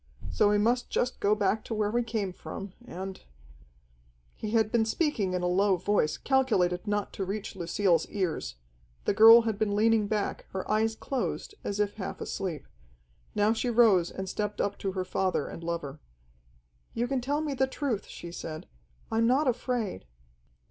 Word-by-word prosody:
So 205 - +3
we 205 - +3
must 240 +4 +1
just 250 - -1
go 205 +1 +3
back 210 +1 +1
to 225 - -3
where 210 -1 0
we 240 +2 +2
came 215 -5 -2
from, 195 +1 -8
and 190 -3 -7 0.6
" - - -35
He 215 - -2
had 220 -1 +2
been 235 -2 +3
speaking 220 - 0
in 180 -1 -1
a - - +2
low 190 +1 +3
voice, 175 -4 +1
calculated 215 -9 +1
not 205 0 -1
to 195 - -3
reach 195 +2 -4
Lucille's 175 -1 +1
ears. 175 - -2 0.5
The - - +2
girl 225 +3 +9
had 220 -2 -2
been 205 -2 +1
leaning 220 0 +3
back, 210 -1 -2
her 190 -1 -4
eyes 220 +1 +1
closed, 270 - -3
as 205 0 -3
if 205 -1 +1
half 190 - -5
asleep. 170 -8 -4 0.7
Now 210 +2 +3
she 235 +2 -1
rose 220 -7 +5
and 190 0 -6
stepped 210 +2 -3
up 200 - 0
to 195 -1 -2
her 185 -1 -2
father 185 0 0
and 165 - -8
lover. 165 -4 -4 1.0
"You 240 +1 0
can 265 0 -1
tell 285 +4 -1
me 300 -2 -2
the 265 0 +1
truth," 260 -6 -3
she 170 - -9
said. 155 -2 -6 0.5
"I'm 225 +1 +3
not 270 +4 +3
afraid." 240 - -1
205 Hz, 180 wpm, -29 LUFS, 185-225 Hz, 1.0 s, girl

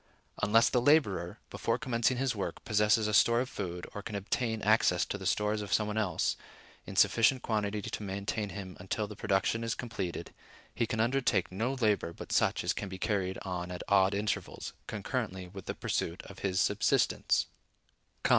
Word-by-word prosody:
Unless 115 +3 +5
the 125 - +3
laborer, 105 - +3
before - - 0
commencing 120 0 +1
his 130 -2 0
work, 95 -5 -4
possesses 105 +1 +3
a 105 - -1
store 115 +3 +5
of 130 - -3
food, 90 -2 -5
or 105 - -5
can 105 0 -6
obtain 110 +3 -1
access 105 -4 +4
to - - -4
the 95 -2 -4
stores 105 +2 +1
of 100 -2 -6
some 105 - +3
one 105 +1 -3
else, 90 -6 0 0.5
in - - -7
sufficient 125 +2 +4
quantity 105 -2 -1
to - - -4
maintain 100 +1 -3
him 95 -3 -7
until 95 +4 -2
the 105 0 -9
production 100 +4 +1
is 115 0 -1
completed, 95 -8 -5 0.4
he 115 - 0
can 110 -1 -2
undertake 115 -6 +2
no 115 +8 -1
labor 105 -8 +1
but - - -9
such - - +2
as - - +1
can 100 - -5
be 95 - -6
carried 95 -2 -1
on 90 -2 -4
at 90 -1 -5
odd 100 0 +4
intervals, 105 +1 -3
concurrently 105 -4 -3
with 95 0 -10
the - - -3
pursuit 85 +2 -2
of 100 - -11
his 95 -1 0
subsistence. - - +2
105 Hz, 185 wpm, -31 LUFS, 95-115 Hz, 0.5 s, Unless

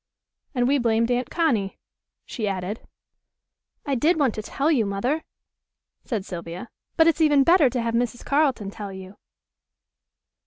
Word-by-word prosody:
"And 245 -1 +2
we 280 +1 +3
blamed 230 0 +1
Aunt 245 +1 0
Connie," 235 - 0 0.5
she 220 -5 -4
added. 195 +2 -3 1.1
"I 285 - -1
did 315 +7 +2
want 265 -6 +2
to 215 - -4
tell 280 +8 0
you, 260 -8 +3
Mother," 230 +10 -1 0.8
said 215 -7 -3
Sylvia, 175 +4 -7 0.3
"but 325 - +6
it's 330 0 +3
even 295 -3 +5
better 335 -3 +5
to 245 0 -2
have 230 0 -1
Mrs. 240 0 -1
Carleton 275 -9 +1
tell 205 -1 -7
you." 190 +1 -10
240 Hz, 150 wpm, -24 LUFS, 205-285 Hz, 1.1 s, but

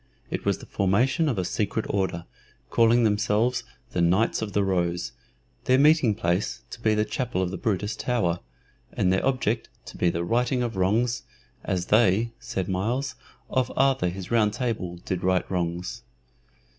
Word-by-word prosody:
It - - -3
was - - +2
the - - -12
formation 125 - +1
of 120 - -1
a 90 - 0
secret 105 +2 -1
order, 95 -4 -1 0.5
calling 115 +1 +4
themselves 110 +3 +1 0.3
the 90 - 0
"Knights 95 +8 +2
of 105 -3 -4
the 100 - +2
Rose," 90 -2 0 0.5
their 130 - +4
meeting 145 -6 +5
place 90 -1 -1
to 115 - -9
be 110 -1 +3
the 105 0 +2
chapel 110 -2 -2
of 90 - -2
the 95 - -4
Brutus 105 -2 -1
Tower, 90 -9 0 0.5
and 90 - +2
their 95 - +1
object 125 -4 0 0.2
to - - -10
be 90 - +2
the 85 0 -2
righting 125 +6 +1
of 115 -3 -3
wrongs, 115 +6 +1 0.4
"as 90 -2 -1
they," 110 +1 +4
said 95 -6 -3
Myles, 120 +9 -1 0.3
"of 130 -1 0
Arthur 135 -7 +3
his 95 +2 -7
Round 110 -3 +3
table 105 -8 -3
did 90 -2 -2
right 95 0 +2
wrongs." 85 -1 -2
105 Hz, 170 wpm, -26 LUFS, 90-120 Hz, 0.5 s, meeting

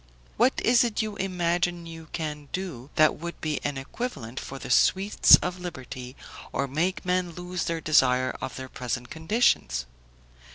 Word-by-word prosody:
"What 245 +4 +3
is 240 +1 +5
it 230 -2 0
you 215 -1 -4
imagine 175 -2 0
you 165 -1 -9
can 150 -3 -5
do, 165 -9 -5
that 155 0 +4
would 170 +1 -7
be 155 -2 -2
an 145 -1 -2
equivalent 135 - -5
for 135 - -7
the 130 - -6
sweets 195 +10 +6
of 180 0 -3
liberty, 130 -7 -7 0.4
or 140 - -1
make 170 +9 -1
men 180 -1 0
lose 180 +1 -4
the 165 -1 -2
desire 130 -4 +3
of 130 - -5
their 130 0 -6
present 125 -1 -4
conditions? 160 - +1
165 Hz, 160 wpm, -26 LUFS, 130-180 Hz, 0.4 s, sweets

